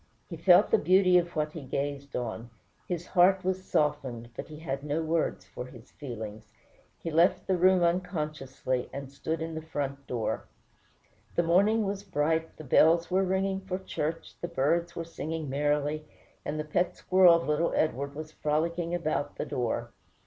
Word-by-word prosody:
He -, -, -3 dB
felt -, -, +5 dB
the 450 Hz, -, +5 dB
beauty 185 Hz, -1 st, +5 dB
of 175 Hz, 0 st, -4 dB
what 150 Hz, -1 st, 0 dB
he 160 Hz, -, -7 dB
gazed 140 Hz, +1 st, -4 dB
on; 115 Hz, -1 st, -4 dB, 0.4 s
his 175 Hz, -1 st, -3 dB
heart 185 Hz, +1 st, +4 dB
was 185 Hz, 0 st, -1 dB
softened, 125 Hz, -8 st, -1 dB
but -, -, -6 dB
he 155 Hz, -, -10 dB
had 140 Hz, -3 st, -4 dB
no 150 Hz, +2 st, -1 dB
words 160 Hz, -, -1 dB
for 110 Hz, +5 st, -7 dB
his 125 Hz, -2 st, -14 dB
feelings. 110 Hz, -5 st, -8 dB, 0.5 s
He 165 Hz, -, -5 dB
left 170 Hz, +4 st, +3 dB
the 190 Hz, -, +2 dB
room 185 Hz, 0 st, +4 dB
unconsciously, 155 Hz, -8 st, -1 dB
and 140 Hz, -1 st, -7 dB
stood 160 Hz, +4 st, -3 dB
in 165 Hz, 0 st, -5 dB
the 160 Hz, -, -4 dB
front 140 Hz, -3 st, -4 dB
door. 115 Hz, -3 st, -2 dB, 0.9 s
The 175 Hz, -, +3 dB
morning 200 Hz, +7 st, +4 dB
was 195 Hz, 0 st, -2 dB
bright, 160 Hz, -3 st, -1 dB
the 155 Hz, -, -9 dB
bells 165 Hz, +5 st, +4 dB
were 190 Hz, +1 st, +3 dB
ringing 190 Hz, +1 st, 0 dB
for 190 Hz, -1 st, -3 dB
church, 165 Hz, -4 st, -4 dB
the 175 Hz, -, -2 dB
birds 170 Hz, +4 st, 0 dB
were 165 Hz, -, -4 dB
singing 160 Hz, -3 st, -4 dB
merrily, 150 Hz, +2 st, 0 dB, 0.4 s
and 155 Hz, +1 st, -3 dB
the -, -, -1 dB
pet 175 Hz, +4 st, 0 dB
squirrel 185 Hz, -2 st, +6 dB
of 170 Hz, -, -1 dB
little 150 Hz, +3 st, +1 dB
Edward 140 Hz, -2 st, 0 dB
was 155 Hz, +1 st, -7 dB
frolicking 165 Hz, +3 st, -1 dB
about 155 Hz, -4 st, -2 dB
the -, -, -3 dB
door. 120 Hz, -2 st, -2 dB
160 Hz, 175 wpm, -29 LUFS, 140-175 Hz, 0.9 s, squirrel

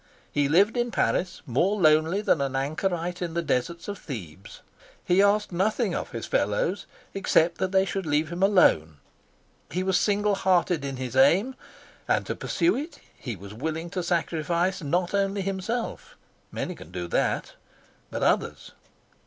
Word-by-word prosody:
He 145 Hz, -1 st, +1 dB
lived 200 Hz, +9 st, +4 dB
in 240 Hz, 0 st, +1 dB
Paris 185 Hz, -5 st, -1 dB
more 175 Hz, -, +1 dB
lonely 160 Hz, +3 st, +4 dB
than 165 Hz, -8 st, +2 dB
an 135 Hz, -1 st, -2 dB
anchorite 170 Hz, +5 st, -2 dB
in 170 Hz, -2 st, -3 dB
the 170 Hz, -, 0 dB
deserts 165 Hz, +4 st, -2 dB
of 205 Hz, -1 st, -5 dB
Thebes. 95 Hz, -, -9 dB, 0.4 s
He 180 Hz, +2 st, +4 dB
asked 205 Hz, +1 st, +2 dB
nothing 200 Hz, +2 st, 0 dB, 0.2 s
his 115 Hz, -2 st, -5 dB
fellows 165 Hz, -, 0 dB, 0.3 s
except 175 Hz, -3 st, +2 dB
that 190 Hz, -1 st, -1 dB
they 190 Hz, 0 st, +3 dB
should 195 Hz, -2 st, -3 dB
leave 150 Hz, +1 st, +1 dB
him 175 Hz, +2 st, -4 dB
alone. 80 Hz, -, +4 dB, 0.7 s
He 180 Hz, +4 st, -2 dB
was 190 Hz, -1 st, +2 dB
single 205 Hz, 0 st, +1 dB
hearted 180 Hz, -5 st, +2 dB
in 135 Hz, -1 st, -4 dB
his 130 Hz, -1 st, -5 dB
aim, 175 Hz, -, +4 dB, 0.5 s
and -, -, +1 dB
to -, -, -3 dB
pursue 340 Hz, +2 st, +1 dB
it 300 Hz, +6 st, -5 dB, 0.2 s
he 120 Hz, -4 st, -6 dB
was 100 Hz, +2 st, -11 dB
willing 160 Hz, +8 st, -4 dB
to 185 Hz, -, -2 dB
sacrifice 170 Hz, +2 st, 0 dB
not 175 Hz, +5 st, -1 dB
only 195 Hz, 0 st, 0 dB
himself 195 Hz, +5 st, -4 dB, 0.4 s
many -, -, -4 dB
can -, -, -13 dB
do 90 Hz, -1 st, -5 dB
that -, -, -1 dB, 0.6 s
but -, -, -3 dB
others. -, -, 0 dB
175 Hz, 160 wpm, -26 LUFS, 145-195 Hz, 0.7 s, lived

